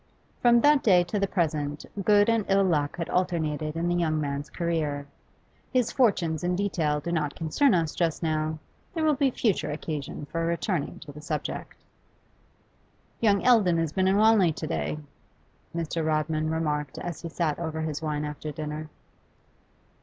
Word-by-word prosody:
From 240 -1 +5
that 295 0 +5
day 180 -5 +5
to 190 +4 -2
the 200 - +1
present 150 -5 -1 0.2
good 205 0 +5
and 230 -2 +2
ill 195 0 +4
luck 160 -3 0
had 170 - -3
alternated 160 -4 -1
in 170 +1 -1
the 175 - +1
young 160 -3 +1
man's 145 0 -3
career. 155 -4 -2 0.7
His 250 -3 +1
fortunes 180 - +1
in 180 0 +1
detail 165 -6 0
do 170 +4 -4
not 150 -4 -1
concern 195 - +2
us 165 -3 0
just 170 -1 -1
now; 155 -1 0 0.4
there 325 - 0
will 305 - +4
be 275 -1 +2
future 200 -11 0
occasion 150 -1 -5
for 165 +3 -3
returning 170 -1 -1
to 150 - -9
the 150 +1 -11
subject. 150 -1 -5 1.4
'Young 205 -3 +3
Eldon 210 -9 +5
has 165 -2 -1
been 190 0 +2
in 190 +1 +3
Wanley 215 -5 +5
to - - -5
day,' 75 -1 -2 0.8
Mr. 165 0 -2
Rodman 155 0 0
remarked 150 -3 -2
as 175 -3 -5
he 170 - -5
sat 160 -2 -1
over 160 -2 -3
his 155 -1 -3
wine 150 -1 -2
after 150 +1 -5
dinner. 155 0 -5
165 Hz, 170 wpm, -27 LUFS, 150-190 Hz, 1.4 s, From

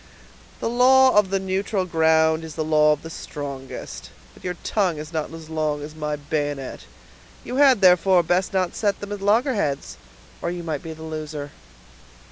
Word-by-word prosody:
"The - - -1
law 260 +2 +5
of 210 -2 +4
the 195 0 0
neutral 190 +1 -1
ground 160 -1 +3
is 160 -1 -8
the 155 - -1
law 150 -1 +4
of 150 -1 -1
the 165 - -8
strongest; 140 -4 -7 0.2
but - - -19
your 180 -1 -3
tongue 190 -7 0
is 155 +2 -8
not 155 -1 -2
as 165 -1 -10
long 155 -2 -2
as 150 +1 -8
my 150 -1 -3
bayonet; 145 -2 -4 0.6
you 250 - -4
had, 270 -6 +5
therefore, 180 0 +5
best 180 +3 +1
not 185 -3 0
set 205 -3 0
them 205 0 -7
at 205 -1 -5
loggerheads, 205 - 0 0.4
or 170 - -1
you 175 0 -5
might 155 -4 -3
be 160 - -7
the 160 0 -11
loser." 155 -2 -6
165 Hz, 180 wpm, -23 LUFS, 150-195 Hz, 0.6 s, law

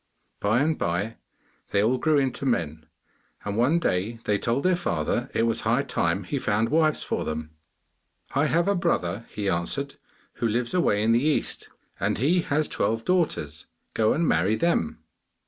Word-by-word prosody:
By 110 +5 +2
and 155 +1 +1
by 90 +7 -1 0.5
they 100 - +2
all 125 +4 +2
grew 155 -2 +3
into 135 -1 0
men, 80 - -1 0.6
and 100 0 -2
one 125 +9 +3
day 110 - -1
they 105 -1 +1
told 120 +3 0
their 185 0 +3
father 85 - -1
it - - +2
was 115 0 +1
high - - +2
time - - 0
he - - -3
found 110 +3 +1
wives 155 0 +2
for - - -2
them. 80 0 -4 0.8
'I 145 +3 +2
have 170 +3 +2
a 200 - +3
brother,' 115 - -1
he 105 -1 -4
answered, 115 +11 -1 0.4
'who 115 - 0
lives 120 +2 -1
away 105 - +2
in 115 - +3
the 120 +3 +3
East, 155 0 0 0.3
and 100 +3 0
he 160 - +2
has 155 -1 0
twelve 115 +1 -1
daughters; 115 - -1 0.3
go 110 -1 +2
and 165 +1 +1
marry 95 +7 +2
them. 165 - 0
115 Hz, 175 wpm, -25 LUFS, 100-150 Hz, 0.8 s, grew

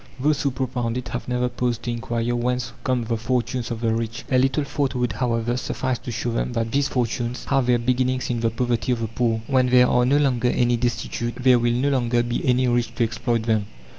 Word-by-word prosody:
Those 145 +2 +1
who 140 - +1
propound 125 -2 -2
it 125 - -5
have 120 - -5
never 125 0 0
paused 120 -1 -2
to 120 - -2
inquire 120 0 -2
whence 120 -1 -1
come 130 -2 0
the 115 0 -1
fortunes 120 +1 -1
of 115 -1 -4
the 115 -1 +1
rich. 115 0 -3
A 130 - +4
little 135 +3 +2
thought 140 -1 -2
would, 125 -2 0
however, 120 -1 0
suffice 130 0 -2
to 120 - -6
show 120 +1 -2
them 115 +1 -2
that 115 -1 -1
these 140 0 +2
fortunes 120 -1 -2
have 135 -3 +1
their 125 -1 +4
beginnings 125 +1 0
in 120 - -1
the 115 0 +1
poverty 120 +1 0
of 115 - -3
the 115 - -1
poor. 115 -1 -1
When 130 -1 +2
there 125 0 +6
are 125 0 +3
no 135 +4 +3
longer 125 -4 +2
any 120 0 +2
destitute, 120 0 -2
there 130 -1 +5
will 120 0 +1
no 130 +4 +1
longer 120 -3 +1
be 120 0 -2
any 125 0 +2
rich 120 -1 0
to 120 - +1
exploit 115 0 -1
them. 110 -3 0
120 Hz, 230 wpm, -23 LUFS, 115-125 Hz, -, there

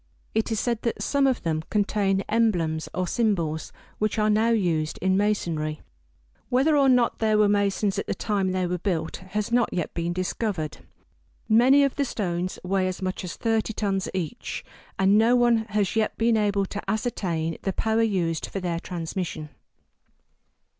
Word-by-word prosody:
It 220 +1 0
is 220 - 0
said 235 -1 -1
that 230 - -2
some 280 -1 +2
of 260 -3 0
them 160 -2 0
contain 200 -2 +1
emblems 175 -9 +1
or 185 - -1
symbols, 170 -9 0 0.3
which 215 +1 0
are 215 0 +3
now 220 +2 +3
used 170 -9 0
in 190 +1 +2
masonry. 170 -7 -1 0.7
Whether 270 +5 +3
or 275 -2 +5
not 250 -2 +3
there 215 -1 +2
were 210 -1 +5
masons 200 0 +1
at - - -4
the - - -1
time 200 -4 0
they 185 0 0
were 180 0 -2
built, 170 -4 -2
has 205 +4 -4
not 240 -1 +2
yet 175 -3 -3
been 170 0 -2
discovered. 185 -2 -2 0.7
Many 255 +6 +6
of 275 - 0
the 285 - +1
stones 185 -6 -2
weigh 190 0 +1
as 185 +1 -4
much 185 0 -3
as 180 - -5
thirty 225 -1 0
tons 195 -3 -1
each, 185 +5 -4 0.3
and 195 +2 +4
no 230 +3 +4
one 240 -2 +3
has 210 -2 0
yet 220 -1 0
been 230 0 +3
able 205 -2 +1
to 205 +1 -5
ascertain 185 -8 -2
the 195 - -1
power 220 +3 +1
used 180 -7 0
for 195 - -4
their 175 -2 -2
transmission. 170 -3 -5
200 Hz, 175 wpm, -25 LUFS, 180-225 Hz, 0.7 s, Many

